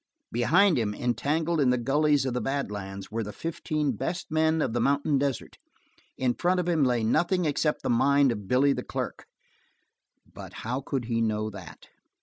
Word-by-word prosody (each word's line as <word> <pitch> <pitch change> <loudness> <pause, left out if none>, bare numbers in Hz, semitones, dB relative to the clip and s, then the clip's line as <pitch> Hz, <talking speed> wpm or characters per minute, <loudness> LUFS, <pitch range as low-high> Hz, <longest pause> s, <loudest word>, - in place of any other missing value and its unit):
Behind 160 - +3
him, 105 -2 -1
entangled 155 +7 0
in 130 - +3
the 125 - +3
gullies 145 +3 +2
of 130 - -1
the 125 - -1
bad 135 -4 -2
lands, 95 -1 -7
were 115 +1 -2
the 105 -1 -5
fifteen 155 0 -2
best 170 - -4
men 160 0 +2
of 125 -7 0
the 120 - 0
mountain 140 +2 +2
desert. 140 -3 -3 0.6
In 125 -2 +1
front 180 +5 +1
of 180 - -2
him 165 -4 +2
lay 120 -3 +1
nothing 175 - +1
except 150 0 0
the - - -1
mind 140 +3 +4
of 105 -4 -6
Billy 135 +4 +3
the - - -3
clerk. - - -5 1.0
But - - -11
how 125 +4 -2
could 130 -3 -3
he 115 -1 -1
know 110 -1 -1
that? 95 -5 -12
135 Hz, 185 wpm, -27 LUFS, 115-155 Hz, 1.0 s, mind